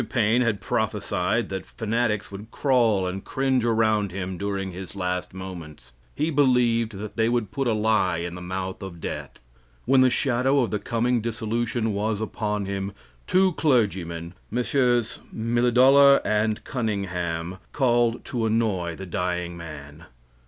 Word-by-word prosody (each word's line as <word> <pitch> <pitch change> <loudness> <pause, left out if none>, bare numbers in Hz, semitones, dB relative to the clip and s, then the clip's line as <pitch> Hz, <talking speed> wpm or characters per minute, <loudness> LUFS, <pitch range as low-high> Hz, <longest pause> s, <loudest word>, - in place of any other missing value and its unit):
Mr. - - -7
Paine 120 0 +2
had 110 -5 0
prophesied 105 -2 -1
that 95 0 -4
fanatics 115 -2 -2
would 100 +3 -9
crawl 115 -9 +2
and 90 +1 -4
cringe 130 -2 0
around 110 -3 +2
him 95 0 -4
during 95 0 -3
his 95 +2 -8
last 90 -1 -2
moments. 85 -9 -9 0.2
He 155 +3 0
believed 125 -5 +3
that 105 +3 -7
they 115 0 +3
would 120 -5 -1
put 135 +2 -1
a 115 - +2
lie 105 -5 +2
in 85 +1 -4
the 90 - -8
mouth 95 +1 -4
of 95 -3 -8
death. - - -6 0.5
When 130 +1 +5
the 130 - +6
shadow 130 +2 +2
of 120 - -1
the 105 - -1
coming 120 +1 0
dissolution 115 0 -1
was 105 +1 -1
upon 105 -2 -2
him, 100 0 -3 0.3
two 185 0 +3
clergymen, 95 - 0 0.2
Messrs. 120 -1 +1
Milledollar 125 +5 +5
and 105 0 0
Cunningham, 95 -6 -3
called 120 -3 +1
to 115 -3 -1
annoy 105 -7 0
the 95 - -7
dying 90 0 -2
man. 75 -2 -10
110 Hz, 150 wpm, -25 LUFS, 95-120 Hz, 0.5 s, the